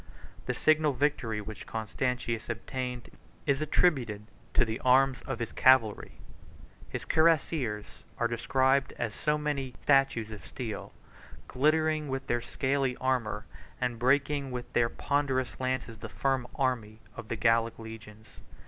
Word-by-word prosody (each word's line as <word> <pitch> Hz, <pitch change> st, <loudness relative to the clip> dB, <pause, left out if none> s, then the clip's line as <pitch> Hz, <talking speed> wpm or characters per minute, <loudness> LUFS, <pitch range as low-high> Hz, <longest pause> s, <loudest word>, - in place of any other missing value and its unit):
The -, -, 0 dB
signal 155 Hz, -2 st, +3 dB
victory 125 Hz, -5 st, 0 dB
which 105 Hz, +1 st, -8 dB
Constantius 115 Hz, +1 st, -2 dB
obtained 125 Hz, +1 st, -4 dB, 0.3 s
is 140 Hz, -1 st, +1 dB
attributed 130 Hz, -10 st, +1 dB, 0.3 s
to 130 Hz, -, +5 dB
the 110 Hz, +2 st, -3 dB
arms 130 Hz, 0 st, +4 dB
of 135 Hz, -, -2 dB
his 115 Hz, -1 st, -4 dB
cavalry. 130 Hz, -5 st, +4 dB, 0.8 s
His -, -, -5 dB
cuirassiers 155 Hz, -9 st, +1 dB, 0.2 s
are 115 Hz, -, +2 dB
described 130 Hz, +3 st, +2 dB
as 110 Hz, -, -2 dB
so 150 Hz, +6 st, 0 dB
many 150 Hz, -2 st, -1 dB
massy 130 Hz, -, -13 dB
statues 135 Hz, -6 st, +3 dB
of 105 Hz, -, -8 dB
steel, 115 Hz, -5 st, -6 dB, 0.6 s
glittering 155 Hz, +2 st, +2 dB
with 135 Hz, 0 st, -3 dB
their 120 Hz, 0 st, 0 dB
scaly 135 Hz, +1 st, 0 dB
armor, 125 Hz, -5 st, -1 dB, 0.3 s
and 125 Hz, -2 st, -1 dB
breaking 135 Hz, +2 st, +2 dB
with 125 Hz, -1 st, -6 dB
their 115 Hz, -1 st, +3 dB
ponderous 135 Hz, -2 st, -1 dB
lances 130 Hz, -3 st, -2 dB
the -, -, -7 dB
firm 135 Hz, -2 st, 0 dB
array 120 Hz, -5 st, 0 dB, 0.2 s
of 110 Hz, -, -8 dB
the 115 Hz, -, -2 dB
Gallic 115 Hz, 0 st, +2 dB
legions. 110 Hz, -1 st, -11 dB
130 Hz, 140 wpm, -30 LUFS, 115-140 Hz, 0.8 s, to